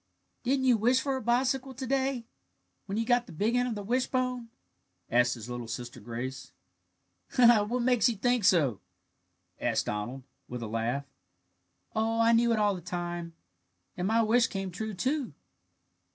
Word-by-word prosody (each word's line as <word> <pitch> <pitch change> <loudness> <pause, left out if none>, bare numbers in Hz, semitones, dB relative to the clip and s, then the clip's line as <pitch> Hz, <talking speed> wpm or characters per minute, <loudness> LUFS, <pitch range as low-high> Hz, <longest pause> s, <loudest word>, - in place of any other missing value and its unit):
"Didn't 265 +1 +1
you 250 -3 +5
wish 245 +4 +3
for 270 0 -1
a 260 - -3
bicycle 255 +3 0
to 260 +2 -5
day, 265 -2 0 0.6
when 200 +1 -3
you 225 - 0
got 245 0 +2
the - - -11
big 210 +9 0
end 245 0 +2
of 235 - -3
the 205 - -5
wishbone?" 250 +1 -1 0.6
asked 120 +1 +3
his 115 -1 -9
little 120 -1 -5
sister 120 +2 -6
Grace. 125 +4 -6 0.8
"What 240 0 +5
makes 250 0 +4
you 235 - -2
think 245 +2 +1
so?" 145 - +3 0.8
asked 115 -2 0
Donald, 120 +6 -4 0.2
with 125 -1 -6
a - - -4
laugh. 115 +5 -2 0.9
"Oh, 225 +1 +1
I 230 0 +5
knew 235 +1 +4
it 230 - +2
all 210 -1 +3
the 180 - -6
time; 175 -1 -5 0.6
and 180 +1 -2
my 225 +2 +3
wish 230 +2 +4
came 195 -1 -4
true, 215 +3 -5
too." 265 - -1
220 Hz, 165 wpm, -29 LUFS, -, 0.9 s, you